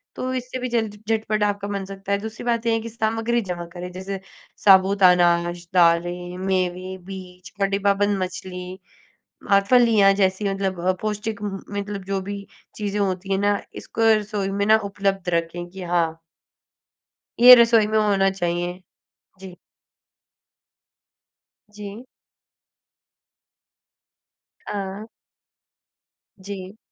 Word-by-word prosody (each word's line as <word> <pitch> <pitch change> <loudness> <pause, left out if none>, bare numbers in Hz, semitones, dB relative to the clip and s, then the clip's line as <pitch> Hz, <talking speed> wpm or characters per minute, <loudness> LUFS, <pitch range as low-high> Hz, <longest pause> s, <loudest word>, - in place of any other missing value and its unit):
तो 255 0 -3
इससे 255 0 -4
भी 255 - -3
जल्द 225 -3 -1 0.2
झटपट 215 -1 0
आपका 205 -1 -1
बन 200 -1 -3
सकता 195 0 -7
है। 200 - +3
दूसरी 220 +1 -7
बात 235 -1 0
ये 230 - +2
है 225 - +1
कि 230 - -7
सामग्री 225 +1 -1
जमा 175 -1 -4
करें। 180 0 -7
जैसे 190 +1 -5 0.5
साबूत 195 0 +5
अनाज, 175 -1 +3
दालें, 175 +1 +2
मेवे, 185 0 -2
बीज 185 -1 -10
और 195 - +4
डिब्बाबंद 200 0 +1
मछली 180 0 -7 0.7
और 200 0 +6
फलियाँ 225 -6 +6
जैसी, 195 +1 +1
मतलब 195 -2 -2
अ, - - +5
पौष्टिक 215 0 -3
म 210 - -1 0.2
म 205 - -5
मतलब, 200 -1 -5
जो 195 0 -2
भी 200 +1 -7 0.3
चीज़ें 205 -1 -3
होती 190 0 -2
हैं 195 - +1
ना, 205 0 +1 0.2
इसको 225 -1 +2
रसोई 210 -2 -2
में 200 +1 -1
ना, 220 +1 +6
उपलब्ध 195 -2 -1
रखें 170 +1 -2
कि 190 +1 -10
हाँ 170 -2 +1 1.3
ये 250 +1 +11
रसोई 230 -3 +5
में 215 0 +1
होना 200 -2 +3
चाहिए। 175 -1 -3 0.6
जी। 190 -2 -10 2.2
जी। 210 +3 -9 2.6
हाँ। 200 +1 -5 1.3
जी। 190 +1 -8
195 Hz, 130 wpm, -23 LUFS, 185-210 Hz, 2.6 s, ये